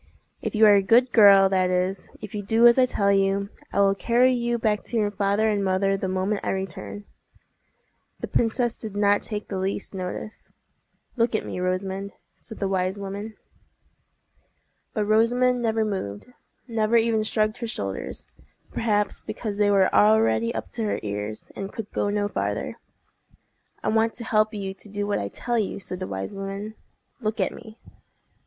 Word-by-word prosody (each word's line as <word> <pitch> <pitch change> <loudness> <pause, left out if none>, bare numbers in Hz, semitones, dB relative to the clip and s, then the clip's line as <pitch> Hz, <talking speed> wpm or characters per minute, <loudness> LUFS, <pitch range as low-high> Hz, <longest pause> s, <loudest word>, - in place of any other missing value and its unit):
If - - -3
you 220 +1 +6
are 210 - +8
a 200 - +5
good 235 +5 +4
girl, 200 -3 +7
that 185 -1 +2
is, 185 +1 -1
if 210 - -8
you 210 - -3
do 225 +4 +3
as 240 +2 +7
I 255 - +5
tell 200 -4 +1
you, 195 0 +1 0.2
I - - +2
will 195 0 +4
carry 240 +5 +3
you 240 -1 0
back 215 -2 0
to 235 - -2
your 210 -2 +1
father 205 +2 +1
and 205 -1 0
mother 195 +1 +1
the 195 -1 -3
moment 190 +2 -1
I - - -2
return." 190 +2 -5 1.1
The - - -4
princess 235 +1 0
did 215 -3 -7
not 205 0 +3
take 210 -2 -3
the 190 - -4
least 195 +2 -3
notice. 190 +3 -6 0.7
"Look 230 -1 +2
at - - -1
me, - - -5
Rosamond," 190 +2 -2 0.2
said 220 - -11
the 195 - -1
wise 190 0 -1
woman. 200 +2 -6 1.6
But 210 -2 0
Rosamond 245 +4 +3
never 225 -1 +1
moved—never 215 - -3
even 225 -1 +2
shrugged 215 +1 0
her 235 - -4
shoulders—perhaps 100 - -4
because 210 -3 -5
they 205 -1 +3
were 195 -2 +3
already 110 +2 +4
up - - -4
to 230 - -4
her 210 - -1
ears, 105 +1 -5
and 195 0 -5
could 220 -3 -7
go 205 - 0
no 205 0 0
farther. - - -3 1.0
"I - - 0
want 225 +1 +2
to 240 - -7
help 215 -2 +2
you 195 -3 -4
to 205 - -12
do 205 0 -3
what 205 - 0
I 100 - -3
tell 235 - -2
you," 205 - -2
said 185 -1 -6
the 185 - -4
wise 95 - -5
woman. 195 +2 -5 0.5
"Look 215 -1 -2
at - - +1
me." 220 0 -12
205 Hz, 175 wpm, -25 LUFS, 195-220 Hz, 1.6 s, are